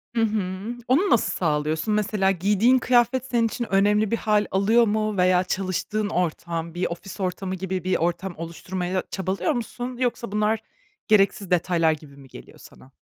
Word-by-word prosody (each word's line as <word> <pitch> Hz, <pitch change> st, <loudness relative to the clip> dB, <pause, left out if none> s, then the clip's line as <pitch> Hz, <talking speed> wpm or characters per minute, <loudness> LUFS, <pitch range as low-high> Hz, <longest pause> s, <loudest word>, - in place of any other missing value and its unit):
Hı 230 Hz, -, +2 dB
hı. 210 Hz, 0 st, -2 dB
Onu 320 Hz, +11 st, +3 dB
nasıl 235 Hz, -, +3 dB
sağlıyorsun? 155 Hz, +3 st, 0 dB
Mesela 210 Hz, -2 st, +1 dB
giydiğin 205 Hz, +7 st, +3 dB
kıyafet 245 Hz, 0 st, +2 dB
senin 240 Hz, -3 st, +1 dB
için 240 Hz, +2 st, -4 dB
önemli 205 Hz, +2 st, +3 dB
bir 230 Hz, -, +2 dB
hâl 210 Hz, -1 st, +1 dB
alıyor 220 Hz, +4 st, +3 dB
mu 215 Hz, 0 st, -1 dB
veya 180 Hz, 0 st, +4 dB
çalıştığın 195 Hz, +3 st, -2 dB
ortam, 170 Hz, -2 st, -2 dB
bir 175 Hz, +2 st, -1 dB
ofis 185 Hz, +4 st, -8 dB
ortamı 190 Hz, 0 st, -3 dB
gibi 185 Hz, 0 st, -4 dB
bir 185 Hz, -, +1 dB
ortam 175 Hz, +2 st, -2 dB
oluşturmaya 180 Hz, +3 st, -4 dB
çabalıyor 190 Hz, -, -1 dB
musun? 245 Hz, 0 st, -5 dB
Yoksa 240 Hz, -3 st, -1 dB
bunlar 210 Hz, +1 st, +1 dB, 0.5 s
gereksiz 200 Hz, -3 st, +2 dB
detaylar 170 Hz, -2 st, +2 dB
gibi 150 Hz, -2 st, -8 dB
mi 135 Hz, -1 st, -14 dB
geliyor -, -, -13 dB
sana? 130 Hz, -, -16 dB
195 Hz, 160 wpm, -24 LUFS, 180-220 Hz, 0.5 s, veya